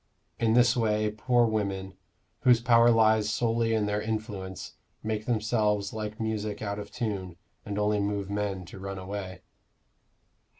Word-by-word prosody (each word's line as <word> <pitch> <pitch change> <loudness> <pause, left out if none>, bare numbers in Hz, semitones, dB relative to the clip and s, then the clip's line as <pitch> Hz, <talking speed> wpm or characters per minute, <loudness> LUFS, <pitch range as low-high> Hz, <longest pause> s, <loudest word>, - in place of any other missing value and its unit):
In 115 0 +3
this 120 +1 +5
way 110 -2 +1
poor 120 +3 +2
women, 100 -4 -2 0.5
whose 125 -2 +5
power 115 0 +5
lies 110 -2 +4
solely 115 +1 +1
in 105 -1 +1
their 105 0 -1
influence, 105 -4 -5 0.3
make 110 +1 -3
themselves 105 -3 +1
like 110 0 -5
music 110 -2 -2
out 100 -1 -3
of 105 0 -7
tune, 95 -6 -4 0.3
and 100 0 -3
only 105 0 +1
move 100 -1 -1
men 100 -2 -2
to 90 - -11
run 95 0 -5
away. 95 -1 -6
105 Hz, 145 wpm, -28 LUFS, 100-110 Hz, 0.5 s, this